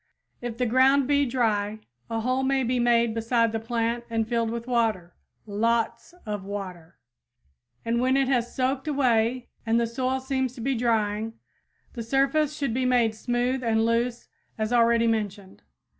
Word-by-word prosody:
If 240 Hz, -2 st, -5 dB
the 250 Hz, -, +1 dB
ground 260 Hz, +3 st, +4 dB
be 285 Hz, -1 st, +2 dB
dry 220 Hz, -3 st, 0 dB, 0.3 s
a 225 Hz, 0 st, -2 dB
hole 255 Hz, +3 st, 0 dB
may 265 Hz, 0 st, +1 dB
be 250 Hz, +1 st, 0 dB
made 235 Hz, -1 st, +3 dB
beside 230 Hz, 0 st, +1 dB
the 225 Hz, -, -2 dB
plant 230 Hz, +1 st, -2 dB
and 225 Hz, -1 st, -1 dB
filled 230 Hz, -1 st, 0 dB
with 235 Hz, 0 st, -4 dB
water 225 Hz, -8 st, 0 dB, 0.3 s
LOTS 230 Hz, -, -1 dB
OF 210 Hz, -2 st, -4 dB
WATER 185 Hz, -4 st, -7 dB, 0.9 s
and 235 Hz, +1 st, 0 dB
when 260 Hz, +1 st, +2 dB
it 270 Hz, -1 st, +2 dB
has 245 Hz, -3 st, 0 dB
soaked 265 Hz, +2 st, -1 dB
away 250 Hz, -4 st, +1 dB
and 230 Hz, +1 st, +2 dB
the 235 Hz, -, +2 dB
soil 255 Hz, +3 st, -1 dB
seems 260 Hz, -1 st, -2 dB
to 250 Hz, -, -9 dB
be 270 Hz, +4 st, 0 dB
drying, 225 Hz, -2 st, 0 dB, 0.6 s
the 235 Hz, -, -5 dB
surface 275 Hz, +5 st, +1 dB
should 275 Hz, -6 st, -1 dB
be 260 Hz, +2 st, 0 dB
made 245 Hz, -3 st, +2 dB
smooth 245 Hz, +3 st, -1 dB
and 225 Hz, -1 st, +2 dB
loose 235 Hz, +1 st, 0 dB, 0.3 s
as 220 Hz, +2 st, -1 dB
already 235 Hz, -1 st, +4 dB
mentioned. 205 Hz, -4 st, -2 dB
235 Hz, 165 wpm, -26 LUFS, 225-255 Hz, 0.9 s, ground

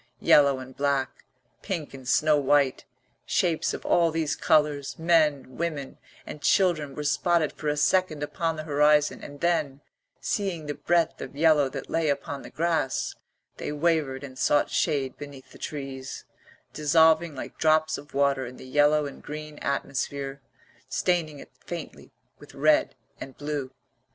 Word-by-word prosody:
Yellow 140 Hz, -2 st, +5 dB
and 130 Hz, 0 st, -10 dB
black, 140 Hz, -2 st, -1 dB, 0.4 s
pink 165 Hz, -8 st, -4 dB
and 130 Hz, -2 st, -10 dB
snow 155 Hz, +3 st, +4 dB
white, 140 Hz, -1 st, +2 dB, 0.4 s
shapes 165 Hz, -3 st, +1 dB
of -, -, -7 dB
all 170 Hz, -1 st, +3 dB
these 155 Hz, -2 st, -1 dB
colours, 150 Hz, -3 st, +1 dB
men, 155 Hz, -6 st, +2 dB
women, 155 Hz, -5 st, -4 dB, 0.3 s
and 150 Hz, -, -8 dB
children 165 Hz, -8 st, +2 dB
were 150 Hz, -, -4 dB
spotted 160 Hz, +1 st, +1 dB
for 155 Hz, -, -6 dB
a 150 Hz, 0 st, 0 dB
second 155 Hz, -1 st, +2 dB
upon 165 Hz, +2 st, -2 dB
the 155 Hz, -, -5 dB
horizon, 150 Hz, 0 st, +3 dB
and 145 Hz, 0 st, -10 dB
then, 155 Hz, -6 st, 0 dB, 0.4 s
seeing 185 Hz, -6 st, -2 dB
the 145 Hz, -, -3 dB
breadth 170 Hz, +3 st, 0 dB
of -, -, -7 dB
yellow 150 Hz, -2 st, +4 dB
that -, -, -7 dB
lay 165 Hz, -2 st, 0 dB
upon 140 Hz, 0 st, -3 dB
the -, -, -10 dB
grass, 160 Hz, -5 st, -1 dB, 0.4 s
they -, -, -4 dB
wavered 150 Hz, -3 st, 0 dB
and 130 Hz, -2 st, -9 dB
sought 145 Hz, -, +2 dB
shade 140 Hz, -5 st, 0 dB
beneath 145 Hz, -2 st, -10 dB
the -, -, -15 dB
trees, 135 Hz, -3 st, -6 dB, 0.5 s
dissolving 160 Hz, +1 st, +3 dB
like -, -, -8 dB
drops 155 Hz, 0 st, +3 dB
of 145 Hz, -1 st, -14 dB
water 140 Hz, -2 st, +2 dB
in 125 Hz, -, -10 dB
the -, -, -11 dB
yellow 145 Hz, +3 st, +3 dB
and 140 Hz, -, -8 dB
green 150 Hz, 0 st, -8 dB
atmosphere, 140 Hz, 0 st, -3 dB, 0.5 s
staining 165 Hz, -5 st, 0 dB
it -, -, -12 dB
faintly -, -, -8 dB, 0.3 s
with -, -, -15 dB
red -, -, +3 dB, 0.2 s
and 135 Hz, -, -9 dB
blue. 145 Hz, -2 st, -3 dB
150 Hz, 155 wpm, -26 LUFS, 140-160 Hz, 0.5 s, Yellow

